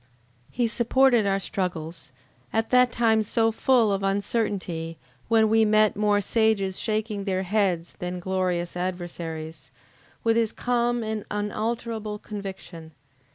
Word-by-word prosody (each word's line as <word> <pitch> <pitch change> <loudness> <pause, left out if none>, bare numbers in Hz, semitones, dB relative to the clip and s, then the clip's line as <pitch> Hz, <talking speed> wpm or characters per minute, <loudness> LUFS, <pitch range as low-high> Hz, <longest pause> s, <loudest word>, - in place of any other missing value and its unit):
He 245 - 0
supported 240 0 +3
our 195 0 +1
struggles, 170 -6 -4 0.4
at 225 0 -1
that 250 -1 +5
time 225 -2 +3
so 225 +1 +1
full 230 -1 +3
of 195 - -1
uncertainty, 195 -5 -2 0.3
when 225 -1 +4
we 225 +1 +4
met 215 0 +4
more 205 0 +2
sages 205 -3 +1
shaking 215 -2 -2
their 190 -1 0
heads, 185 -4 0
than 180 0 -4
glorious 180 -2 -1
adversaries, 170 -3 -5 0.5
with 230 0 +3
his 225 -1 +1
calm 240 -1 0
and 220 -1 -3
unalterable 215 +1 -3
conviction. 190 -6 -8
210 Hz, 125 wpm, -25 LUFS, 185-225 Hz, 0.5 s, that